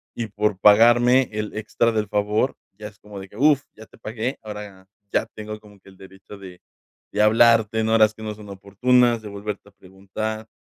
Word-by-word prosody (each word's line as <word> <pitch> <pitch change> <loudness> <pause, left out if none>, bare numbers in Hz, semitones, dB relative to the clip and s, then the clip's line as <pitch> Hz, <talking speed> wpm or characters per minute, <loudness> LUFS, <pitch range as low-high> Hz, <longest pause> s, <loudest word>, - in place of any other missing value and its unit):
y 115 - -4
por 105 -1 -2
pagarme 120 +5 +5
el 105 0 -5
extra 110 +2 0
del 110 -2 -1
favor 105 +5 0 0.2
ya 105 0 -8
es 100 - -25
como 105 -1 -11
de 95 0 -10
que, 105 - -15
¡uf!, 145 +2 +4
ya 110 - -13
te - - -20
pagué, 115 +4 -4
ahora 105 -3 -10 0.2
ya - - +1
tengo 105 0 -7
como 105 -1 -19
que 95 - -19
el 95 - -19
derecho 95 +2 -14
de 95 -2 -13 0.5
de 105 - +1
hablarte 110 0 +4
en 110 0 0
horas 110 -1 +4
que 110 - -15
no 105 -1 -5
son 105 -1 -13
oportunas, 115 +5 +1
de 105 - -8
volverte 100 0 -7
a - - -25
preguntar, 100 +4 -7
105 Hz, 205 wpm, -22 LUFS, 100-110 Hz, 0.5 s, pagarme